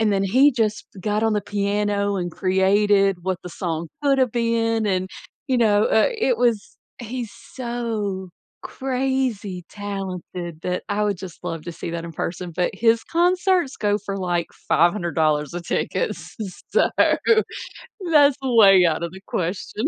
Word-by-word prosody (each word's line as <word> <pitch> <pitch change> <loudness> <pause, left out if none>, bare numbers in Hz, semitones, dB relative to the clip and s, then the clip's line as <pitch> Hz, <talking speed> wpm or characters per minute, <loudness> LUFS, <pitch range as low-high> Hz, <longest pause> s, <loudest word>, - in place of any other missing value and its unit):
and 215 -2 +2
then 195 0 +1
he 260 +9 +5
just 220 -5 -1
got 210 +3 0
on 225 -1 +2
the 210 - +1
piano 205 0 0
and 175 -2 -3
created 195 +1 +3
what 185 0 -1
the 180 - -8
song 165 -2 -3
coulda 275 -2 +3
been, 230 -1 0
and, 185 -1 0 0.4
you 255 -2 +1
know, 210 -2 +4
uh, 220 - +3
it 465 +2 +1
was 230 -4 0 0.2
he's 240 -1 -5
so 230 -6 -4 0.3
crazy 255 -8 -2
talented 185 -4 -6
that 180 0 -2
I 205 +1 0
would 205 -4 -1
just 180 -2 -10
love 165 -3 -4
to 175 - -6
see 170 - -6
that 170 0 -4
in 170 - -7
person, 175 +3 -4
but 180 - +1
his 225 +2 +2
concerts 355 -3 +1
go 205 -1 +1
for, 200 -1 -5
like, 175 -3 -1 0.2
$500 160 -4 +2
a 175 - -3
ticket, 485 - -1
s - - -9 0.4
so - - +3 1.2
that's 290 -2 +6
a 265 -2 -1
way 195 -4 +7
out 160 +1 -1
of 170 - -3
the 190 0 -11
question. 185 +6 -3
205 Hz, 160 wpm, -22 LUFS, 180-230 Hz, 1.2 s, way